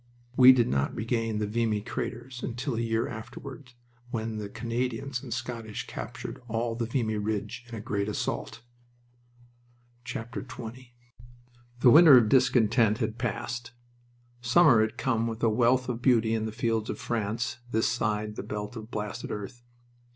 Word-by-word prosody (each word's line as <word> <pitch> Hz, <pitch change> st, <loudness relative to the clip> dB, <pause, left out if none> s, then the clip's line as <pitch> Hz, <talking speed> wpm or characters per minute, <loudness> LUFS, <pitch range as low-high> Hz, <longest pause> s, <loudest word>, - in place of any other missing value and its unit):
We 130 Hz, 0 st, +9 dB
did 125 Hz, -3 st, +3 dB
not 70 Hz, 0 st, 0 dB
regain 115 Hz, -1 st, -1 dB
the 105 Hz, -, 0 dB
Vimy 110 Hz, 0 st, 0 dB
craters 120 Hz, +2 st, -5 dB
until 125 Hz, +3 st, -3 dB
a 115 Hz, -, -2 dB
year 115 Hz, 0 st, 0 dB
afterward, 125 Hz, +3 st, -9 dB, 0.4 s
when 110 Hz, -2 st, -3 dB
the 105 Hz, -1 st, -5 dB
Canadians 120 Hz, +3 st, -3 dB
and 130 Hz, -, -9 dB
Scottish 115 Hz, -2 st, -4 dB
captured -, -, -7 dB
all 115 Hz, +1 st, -1 dB
the 115 Hz, 0 st, -3 dB
Vimy 115 Hz, -3 st, -1 dB
Ridge 105 Hz, +3 st, -3 dB
in 120 Hz, -, -8 dB
a 110 Hz, -, -6 dB
great 100 Hz, 0 st, -2 dB
assault. 105 Hz, -, -3 dB, 1.4 s
XX 120 Hz, +1 st, -7 dB, 0.9 s
The 125 Hz, -, +7 dB
winter 155 Hz, -2 st, +9 dB
of 115 Hz, -3 st, +4 dB
discontent 120 Hz, -4 st, +4 dB
had 110 Hz, +1 st, -3 dB
passed. 120 Hz, 0 st, -3 dB, 0.7 s
Summer 120 Hz, -1 st, +5 dB
had 110 Hz, +2 st, -1 dB
come 115 Hz, -3 st, 0 dB
with 115 Hz, 0 st, -5 dB
a 115 Hz, -, +5 dB
wealth 125 Hz, +3 st, +3 dB
of 120 Hz, -1 st, -3 dB
beauty 115 Hz, -3 st, +3 dB
in 110 Hz, -1 st, -1 dB
the -, -, -4 dB
fields 110 Hz, 0 st, -1 dB
of -, -, -3 dB
France 115 Hz, +2 st, -2 dB
this 110 Hz, -1 st, +1 dB
side 105 Hz, -1 st, -1 dB
the -, -, -2 dB
belt 105 Hz, +2 st, -5 dB
of 110 Hz, -1 st, -8 dB
blasted 105 Hz, -3 st, -5 dB
earth. 105 Hz, +4 st, -6 dB
115 Hz, 155 wpm, -28 LUFS, 110-125 Hz, 1.4 s, We